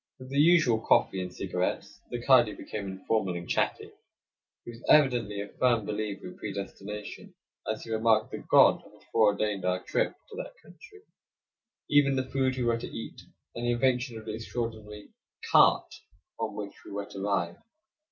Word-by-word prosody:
With 130 -1 -11
the 140 - +1
usual 155 -8 +5
coffee 95 -3 +2
and 90 -1 -5
cigarettes, - - -3
the 120 - -4
kadi 125 -5 +5
became 105 -2 -6
informal 95 0 -1
and 85 0 -6
chatty. - - -1 0.7
He 120 - -7
was 115 0 -14
evidently 120 -8 +4
a 100 - -7
firm 120 -4 +3
believer 105 -1 -4
in 90 - -9
predestination, 105 0 -7 0.4
as 110 - -5
he 115 - -8
remarked 110 0 +2
that - - -8
God - - +6
had - - -20
foreordained 105 -2 +2
our 90 0 0
trip - - 0
to 430 - -10
that - - -7
country, 405 0 -16 0.8
even 145 -2 +4
the 130 0 -1
food 130 -1 0
we 125 - -1
were 115 -1 +1
to - - -6
eat, 115 - -8 0.3
and 115 - -6
the 120 - +2
invention 125 -1 0
of 110 - -10
the 110 - -4
extraordinary 110 -2 -6 0.4
"cart" - - +5 0.5
on - - -3
which 100 -1 -6
we - - -12
were 100 0 -4
to 100 - -9
ride. 90 -4 -1
110 Hz, 170 wpm, -28 LUFS, 100-125 Hz, 0.8 s, God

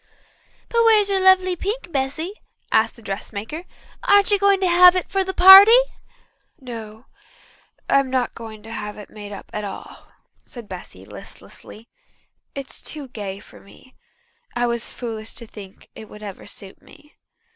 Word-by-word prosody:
"But 465 0 +1
where 450 -1 +6
is 405 -1 0
your 390 - +1
lovely 375 -1 +4
pink, 400 0 -5
Bessy?" 285 +6 -3 0.4
asked 220 +1 +2
the 230 - -17
dressmaker. 215 - -6 0.4
"Aren't 405 0 +4
you 405 - +3
going 400 0 +3
to 375 - +2
have 360 +1 +7
it 365 - -3
for 390 0 +1
the 380 - -4
party?" 385 +5 +9 0.8
"No, 225 -3 -10 0.8
I'm 275 -1 +2
not 255 -2 -1
going 220 -2 -11
to 225 - -11
have 210 -2 -6
it 210 - -12
made 205 -1 -10
up 200 - -11
at 210 - -4
all," 200 -1 -9 0.3
said 235 -4 -12
Bessy 175 - -11
listlessly. 220 - -14 0.7
"It's 275 -1 -5
too 290 -4 -7
gay 200 -5 -7
for - - -16
me. 255 +6 -20 0.6
I 240 0 0
was 235 -1 -3
foolish 225 -2 -7
to 235 - -9
think 200 -3 -14
it 220 - -12
would 210 0 -13
ever 200 -3 -9
suit 195 -1 -10
me. 300 0 -20
250 Hz, 165 wpm, -21 LUFS, -, 0.8 s, party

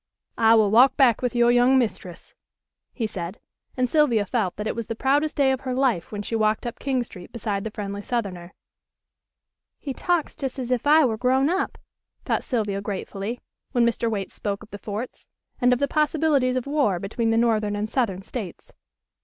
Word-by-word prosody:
"I 225 0 +6
will 215 -3 +4
walk 250 +4 +6
back 250 -5 +4
with 250 -1 -1
your 240 0 +5
young 245 +2 +5
mistress," 210 -8 -3 0.6
he 235 - -3
said, 185 -2 -5 0.4
and 255 0 +2
Sylvia 245 -7 +3
felt 200 -4 -1
that 210 - -5
it - - -2
was 230 -1 -4
the 230 - -3
proudest 285 +5 +1
day 275 -2 +3
of 265 - -1
her 255 -1 -3
life 250 -10 0
when 205 -1 -4
she 225 - -3
walked 215 +1 +1
up 240 - -5
King 265 -3 0
Street 180 -6 -12
beside 210 -4 -3
the 220 - -3
friendly 205 -1 -5
southerner. 195 -7 -4 1.2
"He 275 - -5
talks 350 +2 -1
just 270 -2 -4
as 255 -1 -4
if 250 +2 0
I 305 0 +6
were 225 -3 0
grown 260 +4 +2
up," 375 +2 -1 0.5
thought - - 0
Sylvia 210 -6 -1
gratefully, 200 +3 -5 0.3
when 240 -1 +3
Mr. 235 0 0
Waite 200 -3 -3
spoke 200 0 -4
of 215 - -16
the 205 - -7
forts, 215 +5 -6 0.3
and 250 0 +4
of 250 - +4
the 280 - 0
possibilities 295 -3 +2
of 255 - -1
war 280 -10 +1
between 225 +5 -2
the 225 - +2
northern 220 -3 +2
and 205 +1 -2
southern 215 -6 -1
states. 200 -5 -7
235 Hz, 195 wpm, -24 LUFS, 205-260 Hz, 1.2 s, I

